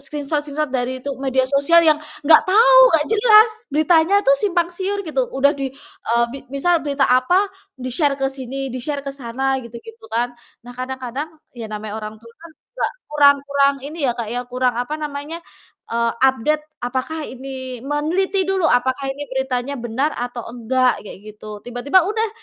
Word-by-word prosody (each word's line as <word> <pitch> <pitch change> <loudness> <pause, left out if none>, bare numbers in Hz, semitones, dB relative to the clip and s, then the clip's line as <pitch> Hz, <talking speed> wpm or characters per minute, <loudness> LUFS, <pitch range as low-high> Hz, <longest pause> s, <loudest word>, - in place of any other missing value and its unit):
screenshot-screenshot 295 0 -3
dari 255 0 -2
itu 280 - -4
media 265 -1 +1
sosial 285 +5 +5
yang 305 -1 +4 0.3
gak 310 +2 +6
tau, - - +6 0.2
gak 300 -2 +4
jelas 435 0 +6 0.2
beritanya 325 +6 +3
tuh - - +5
simpang 355 -6 0
siur 390 +3 -2
gitu, 270 -6 -1
udah 275 +1 +4
di, 275 -3 -4 0.4
eee, 235 +1 +3
bi 275 - -7 0.2
misal 340 +5 +2
berita 280 -3 0
apa 255 +10 +4 0.3
di-share 265 +3 0
ke 270 -1 -1
sini, 270 0 -5
di-share 280 +3 -3
ke 275 - -4
sana 265 +1 -2
gitu-gitu 230 -1 -12
kan. 240 +1 0 0.3
Nah 245 - -10
kadang-kadang 260 +3 -5 0.3
ya 230 - -5
namanya 215 0 -6
orang 215 0 -7
tua 230 0 -15
kan 335 - -12
juga - - -4 0.2
kurang 285 -1 +5
kurang 280 0 +2
ini 310 +4 -7
ya, 240 - +2
Kak, 235 -3 -4
ya 245 - -1
kurang, 250 0 0
apa 250 +5 -3
namanya, 300 +2 -6 0.5
eee, 235 0 +1
update 265 +4 +2 0.2
apakah 260 +6 -3
ini 260 -1 -8
meneliti 360 +7 0
dulu 380 -2 0
apakah 260 -1 +2
ini 290 +1 -8
beritanya 265 +1 -2
benar 245 +4 -1
atau 245 -1 -5
enggak 245 +1 0
kayak 200 - -10 0.2
gitu, 210 -1 -9
tiba-tiba 245 +9 +2
udah 440 +5 -1
275 Hz, 170 wpm, -20 LUFS, 250-310 Hz, 0.5 s, gak